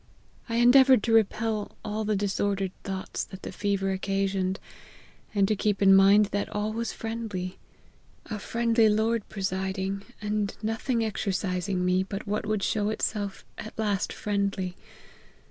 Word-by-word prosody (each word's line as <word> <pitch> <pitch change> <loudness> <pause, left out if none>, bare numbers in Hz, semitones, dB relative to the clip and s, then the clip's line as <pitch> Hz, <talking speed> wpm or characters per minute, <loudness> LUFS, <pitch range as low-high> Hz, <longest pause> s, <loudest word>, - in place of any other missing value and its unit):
I 230 - -1
endeavoured 255 0 +6
to 230 - +1
repel 220 -1 +1
all 215 +1 -2
the 215 0 +1
dis 200 0 -1
ordered 195 -2 0
thoughts 190 -1 -4
that 190 - -11
the - - -5
fever 200 -1 -1
occasioned, 195 0 -1 0.8
and 200 -1 +4
to 215 - +2
keep 205 0 0
in 195 -1 +6
mind 200 +2 +6
that 205 0 -1
all 210 +1 -2
was 230 +1 -2
friendly; 220 -5 -5 0.7
a 215 -2 -5
friendly 230 0 +2
Lord 220 +1 +1
presiding; 190 0 -2 0.2
and 210 -1 -2
nothing 225 +2 0
exercising 190 -3 -1
me 180 +1 +3
but 195 +1 -5
what 210 +1 -2
would 215 -2 0
show 210 -1 +1
itself 205 -2 -2
at 215 - -8
last 205 -3 0
friendly. 200 -3 -2
205 Hz, 145 wpm, -27 LUFS, 195-220 Hz, 0.8 s, endeavoured